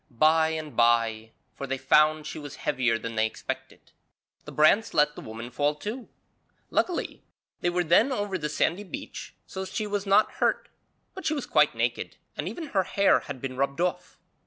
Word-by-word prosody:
By 160 +5 +4
and 155 -2 -5
bye 115 -2 +2 0.2
for 140 - -6
they 135 0 -2
found 155 +3 +3
she 155 - -6
was 145 -2 -8
heavier 120 -3 0
than 115 +1 -6
they 110 0 +2
expected - - -7 0.5
the - - -8
brants 175 +9 +3
let 150 0 +4
the - - -8
woman 115 +2 -8
fall 145 +3 +1
too. 220 - -6 0.6
Luckily 360 - -1 0.4
they 175 - +1
were 175 0 0
then 190 - +4
over 205 -6 -2
the 150 -1 -2
sandy 170 +6 0
beach 195 - -8
so 190 - -6
she 210 +3 -3
was 205 -1 -3
not 200 +2 +4
hurt, - - +1 0.4
but 380 - -5
she 310 - +1
was 285 - -3
quite - - +3
naked - - -2 0.2
and - - -4
even 325 -4 -7
her 195 - +2
hair 195 +2 +3
had 145 -3 -8
been 130 0 -5
rubbed 140 +2 -1
off. 180 0 -2
155 Hz, 185 wpm, -27 LUFS, 135-195 Hz, 0.6 s, By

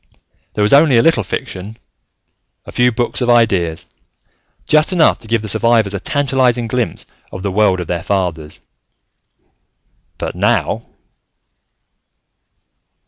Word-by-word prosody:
There 105 - 0
was 105 - +2
only 140 -3 +5
a 115 - +4
little 165 -8 +3
fiction, 95 +2 -6 0.9
a - - -10
few 125 0 +2
books 120 +2 -2
of 125 - 0
ideas, 95 -9 +1 0.8
just 155 +2 +3
enough 175 -4 +3
to 115 - -14
give 115 -1 0
the - - -5
survivors 110 -1 +2
a 100 - -3
tantalizing 130 -1 0
glimpse 120 +1 -3 0.3
of 95 - -8
the 100 - -2
world 95 -2 +2
of 90 - -4
their 85 0 -3
fathers. 85 -6 -3 1.6
But - - -4
now.... - - -1
115 Hz, 130 wpm, -16 LUFS, 95-125 Hz, 1.6 s, only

